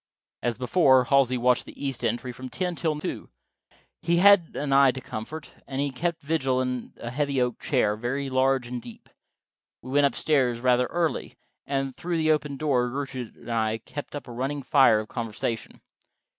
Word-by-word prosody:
As 120 -2 -1
before, 130 0 +4
Halsey 130 -1 +3
watched 125 0 +2
the - - -12
east 135 -2 -3
entry 120 +2 -1
from 130 +1 -8
ten 180 +5 -2
until 160 -3 -2
two. - - -5 0.7
He 170 +1 +2
had 195 -2 +5
an 140 -1 -1
eye 135 0 +7
to 130 - -6
comfort, 140 +6 -7 0.2
and 135 -1 -4
he 140 0 0
kept 165 +4 -3
vigil 135 -4 0
in 125 -1 -3
a 120 - -5
heavy 140 0 0
oak 125 -2 0
chair, 105 0 +1
very 125 +5 -3
large 130 -1 +2
and 120 0 -5
deep. 115 -1 -13 0.7
We 130 - -8
went 145 +1 +5
up - - -5
stairs 130 -6 +1
rather 125 0 +3
early, 170 -2 -2 0.3
and 135 -1 -2
through 175 -1 -2
the 155 -1 +3
open 150 -2 0
door 130 -4 +1
Gertrude 130 -3 -5
and - - -9
I 110 -1 0
kept 145 +6 -8
up 145 - -7
a - - -8
running 135 +4 -3
fire 130 -5 +5
of 110 - -9
conversation. 115 -1 -4
130 Hz, 185 wpm, -26 LUFS, 125-145 Hz, 0.7 s, eye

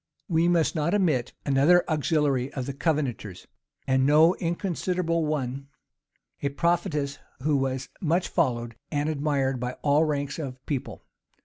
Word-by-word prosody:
We 165 -2 +2
must 170 -2 +2
not 165 +4 0
omit 155 - +1
another 145 +6 +4
auxiliary 145 -4 +1
of 130 -3 -3
the 140 - -4
Covenanters 135 - -2 0.4
and 130 0 +2
no 155 +5 +6
inconsiderable 170 -1 -1
one; 135 -2 -3 0.7
a 140 - 0
prophetess, 150 -2 -1 0.2
who 150 0 +2
was 135 -1 -2
much 170 +2 +1
followed 120 -8 0 0.2
and 145 -1 -1
admired 140 -3 0
by 125 +1 -3
all 145 +2 +4
ranks 145 0 -2
of 135 -5 -5
people. 140 -4 -4
145 Hz, 135 wpm, -26 LUFS, 135-165 Hz, 0.7 s, no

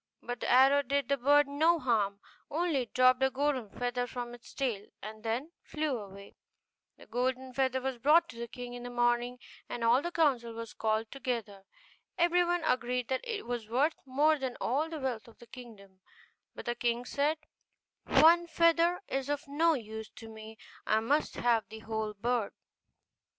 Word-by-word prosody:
But 245 0 -5
the - - -3
arrow 270 +3 +6
did 280 -1 -1
the 280 - +3
bird 290 +3 +4
no 315 +4 +3
harm; 210 -8 0 0.3
only 320 -2 0
it 240 - -8
dropped 255 0 +5
a 265 - +4
golden 265 -4 -1
feather 245 +2 -2
from 240 -1 -6
its 240 -1 -13
tail, 235 -7 -2 0.2
and 215 +1 -8
then 235 +8 -3
flew 305 -3 -2
away. 200 -1 -12 0.6
The - - -15
golden 255 +1 -2
feather 260 0 +1
was 260 -1 -4
brought 305 +7 +5
to 250 - -10
the 235 - -4
king 245 +1 -8
in 245 - -7
the 245 - -6
morning, 240 0 +1 0.3
and 240 - -4
all 235 +3 +4
the 345 - -3
council 260 -9 +1
was 230 -1 -7
called 220 0 -1
together. 230 -7 -4 0.5
Everyone 350 0 +2
agreed 250 -3 0
that 260 -1 0
it 450 -4 -4
was 240 -3 -4
worth 280 +7 +2
more 295 +4 +3
than 260 -2 -4
all 290 +7 0
the 325 - -5
wealth 245 -6 -3
of 230 - -17
the 235 - -14
kingdom: 215 -6 -13 0.5
but - - -8
the 240 - 0
king 240 0 -1
said, 290 +5 0 0.7
'One 335 +5 +6
feather 335 +1 +3
is 270 0 -3
of 290 +1 -2
no 320 +3 +2
use 220 -3 -7
to 225 - -10
me, 220 0 -11 0.3
I 215 - +2
must 285 +7 0
have 230 -2 +1
the 220 - -9
whole 220 -1 -3
bird. 235 0 -1
250 Hz, 180 wpm, -31 LUFS, 230-285 Hz, 0.7 s, arrow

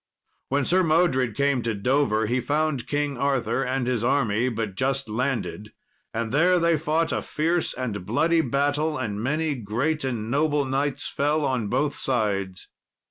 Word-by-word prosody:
When 140 0 +1
Sir 185 +6 +4
Modred 155 - +2
came 140 -1 +1
to 115 -2 -2
Dover, 110 0 +1
he 120 +4 0
found 150 -3 -1
King 145 -2 -1
Arthur 135 -3 0
and 130 0 -1
his 120 -3 0
army 120 -2 +1
but 110 -4 -3
just 135 +5 -1
landed; 110 -2 -3 0.4
and 115 0 -3
there 175 +6 +4
they 170 -1 +3
fought 160 +2 0
a - - -1
fierce 165 +3 -1
and 115 -7 -4
bloody 160 - +2
battle, 145 +3 0
and 105 -5 -3
many 150 +5 0
great 130 +7 -2
and 120 -4 -3
noble 145 0 +1
knights 135 +1 -1
fell 150 +1 0
on 125 -5 -1
both 135 +6 0
sides. 100 -7 -1
135 Hz, 160 wpm, -25 LUFS, 115-150 Hz, 0.4 s, Sir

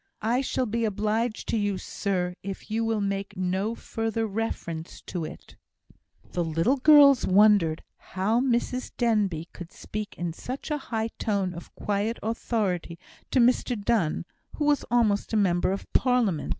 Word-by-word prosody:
I 240 +4 +2
shall 260 -1 -1
be 230 +1 -1
obliged 215 +2 -1
to - - +1
you, 205 -2 0
sir, 185 -2 -2
if 200 +2 -7
you 225 +1 0
will 225 -2 0
make 200 0 -3
no 190 +5 -1
further 225 0 -2
reference 195 -6 -4
to 175 -4 -4
it." - - -11 0.8
The 175 - 0
little 165 - +1
girls 280 -1 +7
wondered 190 -5 +4
how 200 +5 0
Mrs 250 0 -1
Denbigh 205 -9 +1
could 175 -2 -9
speak 215 0 -6
in 170 -1 -3
such 255 - -6
a 230 -6 -2
tone 200 -4 0
of 170 - -11
quiet 210 +3 -1
authority 205 -6 -2 0.3
to 265 - +2
Mr 245 -1 +3
Donne, 200 -7 0 0.3
who 300 - -1
was 290 -2 +3
almost 225 -4 +2
a - - +3
member 185 -3 +2
of 195 - -3
Parliament. 240 - +2
210 Hz, 150 wpm, -26 LUFS, 185-235 Hz, 0.8 s, girls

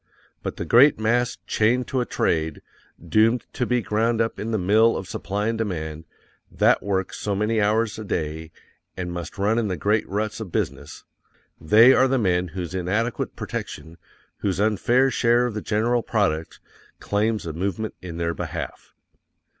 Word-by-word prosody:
_BUT - - -4
THE - - -5
GREAT 125 - +6
MASS, 120 +3 +1
CHAINED 120 +4 +1
TO 130 -2 0
A 120 - -3
TRADE, 80 -1 -1 0.4
DOOMED 110 +8 +3
TO 125 - -1
BE 125 -2 +1
GROUND 115 +3 0
UP 115 0 -1
IN 110 - -4
THE 110 - 0
MILL 110 +5 +3
OF 95 - -6
SUPPLY 105 +4 -2
AND 115 -1 -2
DEMAND, 80 -7 -4 0.5
THAT - - +3
WORK 95 -2 -2
SO 100 -1 -2
MANY 110 +2 +1
HOURS 110 +1 +1
A - - -5
DAY, 80 -4 -4 0.5
AND 90 -1 -4
MUST 85 -3 -6
RUN 105 +4 +1
IN 115 - 0
THE 90 -3 -2
GREAT 105 +7 0
RUTS 105 +2 -2
OF 105 -6 -7
BUSINESS, - - -4 0.6
they 110 +11 +6
are 130 - +4
the 135 0 +1
men 90 -5 +1
whose 90 +1 -6
inadequate 105 +6 -2
protection, 80 +1 -6 0.4
whose 95 -2 -2
unfair 120 +5 +2
share 120 0 +3
of 120 - -2
the 105 - -4
general 115 +4 +1
product, 95 -9 -1 0.4
claims 105 0 -1
a 80 - -4
movement 100 +5 -3
in 85 -3 -7
their 85 0 -1
behalf_. - - -6
105 Hz, 170 wpm, -23 LUFS, 90-115 Hz, 0.6 s, GREAT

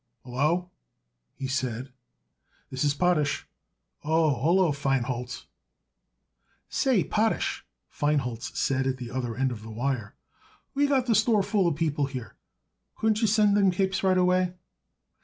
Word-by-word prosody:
"Hallo!" 155 +8 0 0.6
he 135 - -5
said. 130 -3 -2
"Yes, 135 - -17 0.8
this 130 +1 -2
is 145 - +3
Potash. 155 -4 +1 0.6
Oh, 160 -1 +3
hallo, 170 +3 +3
Feinholz!" 130 -3 -2 1.2
"Say, 255 -9 +2
Potash," 220 +1 0 0.2
Feinholz 135 -6 -1
said 135 0 +1
at 130 -1 -1
the 125 -2 -7
other 125 -3 -3
end 130 +1 0
of 110 -3 -6
the 110 - -10
wire, 115 -1 -3 0.6
"we 285 +1 +2
got 270 -3 +2
the 240 - +2
store 215 -1 +3
full 195 -2 +1
of 165 - +1
people 150 -3 0
here. 125 -7 -7 0.6
Couldn't 220 0 +1
you 225 - +3
send 210 -1 +4
up 205 - +4
them 195 - +5
capes 190 +1 0
right 185 -1 +3
away?" 180 0 +2
150 Hz, 145 wpm, -27 LUFS, 130-190 Hz, 1.2 s, them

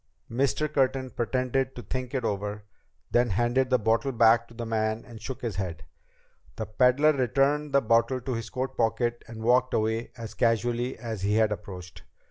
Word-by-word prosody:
Mr. 140 +5 +1
Curtin 135 -3 0
pretended 130 +2 -1
to 120 - -7
think 130 +5 -4
it 125 -3 -1
over. 105 0 -3 0.5
Then 120 0 +3
he 105 - -2
handed 120 +3 +2
the 130 - +4
bottle 115 +4 +1
back 115 -1 +4
to 115 - -16
the 120 0 -5
man 110 0 -1
and 115 -3 -12
shook 125 +3 -6
his 110 -6 -3
head. 90 -4 -4 0.7
The - - -4
peddler 125 +7 +4
returned 140 +3 +1
the 140 - +4
bottle 115 +3 +2
to 130 +1 -4
his 115 -1 -4
coat 130 +1 -3
pocket 120 +1 0
and 110 -1 -8
walked 125 +2 +3
away 110 +2 -1
as 115 -2 -7
casually 120 +1 0
as 110 -4 -5
he 100 +2 +1
had 110 -1 +3
approached. 90 -3 -7
120 Hz, 185 wpm, -27 LUFS, 110-130 Hz, 0.7 s, the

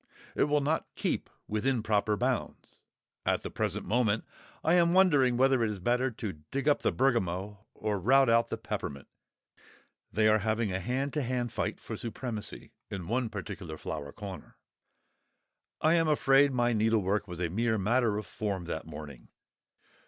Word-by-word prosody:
It - - +3
will 150 0 +2
not 155 +3 0
keep - - -2 0.2
within 115 +2 0
proper 105 -1 +1
bounds. 125 +1 -3 0.4
At - - 0
the - - -5
present - - -2
moment 110 0 +1 0.4
I 160 - +3
am 170 -1 +4
wondering 145 -10 +4
whether 130 -1 +4
it 110 - +1
is 105 - -3
better 125 +7 +1
to 105 -9 -6
dig 140 +1 -2
up 145 - +4
the - - +2
bergamot 105 -6 0 0.2
or 105 -2 -2
rout 135 +7 +5
out 115 0 +4
the - - -4
peppermint; 70 -1 -5 1.0
they 110 0 +3
are 110 0 +5
having 110 0 0
a 95 - -1
hand 130 +8 -2
to 150 - 0
hand 125 -2 -2
fight - - -2
for - - -6
supremacy 115 -2 -5 0.2
in 90 -4 -5
one 120 +1 0
particular 95 -5 -6
flower 70 -1 -5
corner. 100 0 -9 1.2
I 155 - +4
am 165 -1 +3
afraid 140 -2 +4
my 120 -2 +2
needlework 105 -2 +1
was 90 -2 -7
a 90 -2 0
mere 110 +5 +1
matter 110 +1 +2
of 105 - -4
form 100 -4 -3
that 80 -1 -5
morning. 75 -5 -9
115 Hz, 165 wpm, -30 LUFS, 100-130 Hz, 1.2 s, rout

